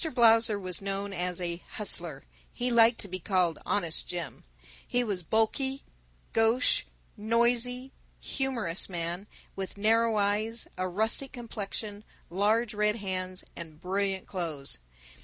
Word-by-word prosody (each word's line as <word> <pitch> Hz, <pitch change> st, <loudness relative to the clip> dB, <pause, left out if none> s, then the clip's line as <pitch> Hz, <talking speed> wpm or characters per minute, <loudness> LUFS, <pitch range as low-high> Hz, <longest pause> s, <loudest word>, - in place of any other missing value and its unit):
Blausser 225 Hz, -2 st, +5 dB
was 185 Hz, -2 st, -1 dB
known 195 Hz, 0 st, -3 dB
as 180 Hz, -1 st, -2 dB
a 170 Hz, -1 st, -2 dB, 0.2 s
Hustler. 170 Hz, -8 st, 0 dB, 0.3 s
He 245 Hz, 0 st, -2 dB
liked 230 Hz, 0 st, +5 dB
to -, -, 0 dB
be 185 Hz, 0 st, -5 dB
called 180 Hz, -3 st, +1 dB
Honest 170 Hz, -6 st, +1 dB
Jim. 170 Hz, -8 st, -4 dB, 0.4 s
He 245 Hz, 0 st, +1 dB
was 200 Hz, -6 st, -1 dB
a -, -, -19 dB
bulky, 265 Hz, -, +1 dB, 0.5 s
gauche, 225 Hz, +3 st, +3 dB, 0.3 s
noisy, 240 Hz, +4 st, +1 dB, 0.3 s
humorous 235 Hz, -12 st, 0 dB
man, 175 Hz, +2 st, -4 dB, 0.3 s
with 195 Hz, 0 st, -5 dB
narrow 225 Hz, +2 st, +3 dB
eyes, 210 Hz, +3 st, +1 dB
a 185 Hz, -, -1 dB
rustic 220 Hz, +8 st, +1 dB
complexion, 215 Hz, -3 st, -5 dB, 0.3 s
large 215 Hz, +5 st, +2 dB
red 210 Hz, 0 st, +2 dB
hands, 185 Hz, -3 st, -3 dB
and 160 Hz, -2 st, -9 dB
brilliant 190 Hz, +1 st, 0 dB
clothes. 160 Hz, -7 st, -4 dB
205 Hz, 130 wpm, -29 LUFS, 185-230 Hz, 0.5 s, Blausser